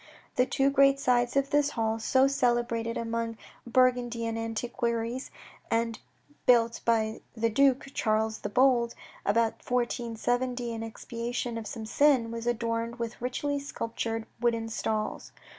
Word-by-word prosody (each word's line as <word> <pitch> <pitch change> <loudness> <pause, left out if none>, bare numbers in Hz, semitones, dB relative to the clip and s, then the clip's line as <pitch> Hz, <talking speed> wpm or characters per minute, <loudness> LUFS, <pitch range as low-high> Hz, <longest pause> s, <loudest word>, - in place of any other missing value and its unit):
The 250 0 +3
two 275 0 +2
great 275 0 +5
sides 245 0 +2
of 275 0 +1
this 290 0 +3
hall, 225 0 0
so 260 +4 +3
celebrated 240 -3 0
among 230 0 -2 0.3
Burgundian 240 -2 +2
antiquaries, 235 +2 -2 0.4
and 230 0 0 0.5
built 230 -2 +4
by 220 -1 +1 0.2
the 230 0 +1
Duke, 270 +2 +3
Charles 220 0 0
the - - -4
Bold, 245 0 +3 0.3
about 225 +2 +2
1470 245 0 -1
in 225 - -5
expiation 235 +1 -4
of 225 -2 -5
some 220 +1 -6
sin, 255 -1 +3
were 230 - -4
adorned 230 0 -1
with 235 -1 -5
richly 285 +3 -1
sculptured 225 -4 -4
wooden 230 -2 0
stalls. 220 -1 -3
235 Hz, 130 wpm, -29 LUFS, 225-250 Hz, 0.5 s, great